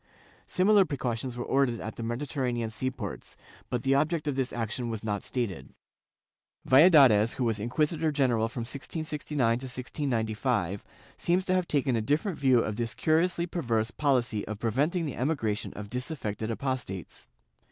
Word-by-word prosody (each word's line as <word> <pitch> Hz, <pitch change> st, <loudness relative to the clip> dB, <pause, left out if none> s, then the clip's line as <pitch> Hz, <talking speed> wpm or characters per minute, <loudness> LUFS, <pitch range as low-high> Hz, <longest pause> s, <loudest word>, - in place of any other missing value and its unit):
Similar 200 Hz, +2 st, +4 dB
pre 145 Hz, -6 st, -4 dB
cautions 120 Hz, 0 st, -3 dB
were 120 Hz, -, -2 dB
ordered 135 Hz, -4 st, +1 dB
at 110 Hz, -, -6 dB
the -, -, -7 dB
Mediterranean 120 Hz, -1 st, -2 dB
sea 125 Hz, +3 st, -2 dB
ports, 120 Hz, -7 st, -7 dB, 0.3 s
but 125 Hz, -2 st, -2 dB
the 135 Hz, -, +3 dB
object 155 Hz, +2 st, +1 dB
of 145 Hz, -, 0 dB
this 130 Hz, -2 st, -1 dB
action 120 Hz, +1 st, -3 dB
was 110 Hz, -2 st, -4 dB
not 105 Hz, -2 st, -2 dB
stated.^ 100 Hz, -, -3 dB, 0.9 s
Valladares, 130 Hz, -, +7 dB
who 130 Hz, -, -1 dB
was 115 Hz, -3 st, 0 dB
inquisitor 155 Hz, +8 st, 0 dB
general 120 Hz, -6 st, +1 dB
from 120 Hz, -, -5 dB
1669 140 Hz, -1 st, -2 dB
to 135 Hz, -, -6 dB
1695, 120 Hz, -, -2 dB, 0.3 s
seems 180 Hz, +2 st, +1 dB
to 185 Hz, -, +1 dB
have 185 Hz, -1 st, +1 dB
taken 140 Hz, -4 st, +1 dB
a 115 Hz, -, +1 dB
different 150 Hz, -, 0 dB
view 130 Hz, -4 st, +4 dB
of 110 Hz, -1 st, -3 dB
this 115 Hz, -1 st, -2 dB
cm 160 Hz, +1 st, +3 dB
iously 175 Hz, -1 st, -3 dB
perverse 115 Hz, -9 st, 0 dB
policy 125 Hz, -7 st, +1 dB
of 105 Hz, 0 st, -4 dB
preventing 145 Hz, -, 0 dB
the 145 Hz, -, -4 dB
emigration 120 Hz, -6 st, -1 dB
of 105 Hz, 0 st, -7 dB
disaffected 125 Hz, -5 st, -4 dB
apostates. 115 Hz, -, -4 dB
125 Hz, 165 wpm, -28 LUFS, 115-145 Hz, 0.9 s, Valladares